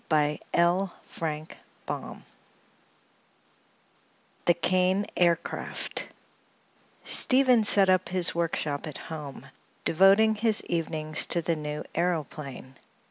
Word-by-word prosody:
CHAPTER 170 +5 +1 0.3
III 155 0 -6 2.2
THE 175 - +5
KANE 185 +3 +2
AIRCRAFT 170 -1 -1 1.0
Stephen 255 -3 +4
set 200 -2 +5
up 185 -2 +2
his 180 -1 0
workshop 160 -3 -2
at 150 - -7
home, 150 -4 -8 0.4
devoting 195 +6 +5
his 220 0 +1
evenings 155 -2 -1
to 170 - +1
the 165 +1 0
new 150 -1 -5
aëroplane. 150 -6 -3
170 Hz, 85 wpm, -27 LUFS, 155-190 Hz, 2.2 s, THE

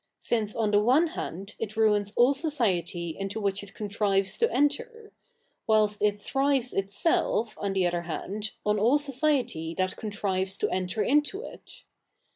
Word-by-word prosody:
ice 215 -3 +1
on 215 -2 +1
the 205 0 +4
one 260 +10 +4
hand 195 - -6
it 220 0 -5
ruins 210 -2 +2
all 245 +3 +5
society 195 - -1
into 195 +2 -3
which 200 -1 -1
it 200 -1 -12
contrives 200 -2 0
to 465 - +4
entir; 455 - -1 0.6
whilst 215 -1 +2
it 205 0 +2
thrives 270 +1 0
itself, 220 - +1
on 200 -1 -1
the 190 -1 +2
other 175 0 0
hand, 195 +5 -5 0.2
071 210 0 +1
all 240 +8 +4
society 270 - -1
that 185 0 -1
contrives 195 -2 -2
to - - 0
enter 185 +3 -1
into 295 - +1
it. - - -12
210 Hz, 155 wpm, -27 LUFS, 195-270 Hz, 0.6 s, all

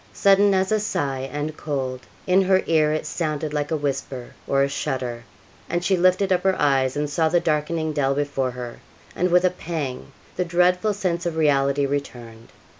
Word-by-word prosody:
Sudden 200 0 +4
as 190 +1 +1
a 215 - +3
sigh, 135 -9 -2
and 150 +2 -4
cold; 135 -5 -3 0.3
in 185 +1 +4
her 190 0 +3
ear 155 -2 +3
it 155 - -2
sounded 155 -2 -3
like 150 -1 -1
a 160 - 0
whisper 135 -3 -4
or 135 0 +3
a - - +2
shudder, 125 -4 -3 0.4
and 175 +1 -1
she 190 - +3
lifted 185 +2 +3
up 180 - +1
her 190 -1 +1
eyes 135 -2 +2
and 150 0 0
saw 160 +2 +1
the 175 - +3
darkening 160 -1 -1
dell 135 -2 +1
before 140 -2 -1
her; 125 -1 -7 0.4
and 180 - +1
with 180 +1 +4
a 180 - +3
pang, 155 -8 -5 0.3
the 180 - +1
dreadful 180 +4 +2
sense 175 -3 -1
of 170 - -3
reality 140 -2 +2
returned. 120 -5 -5
150 Hz, 190 wpm, -23 LUFS, 135-180 Hz, 0.4 s, Sudden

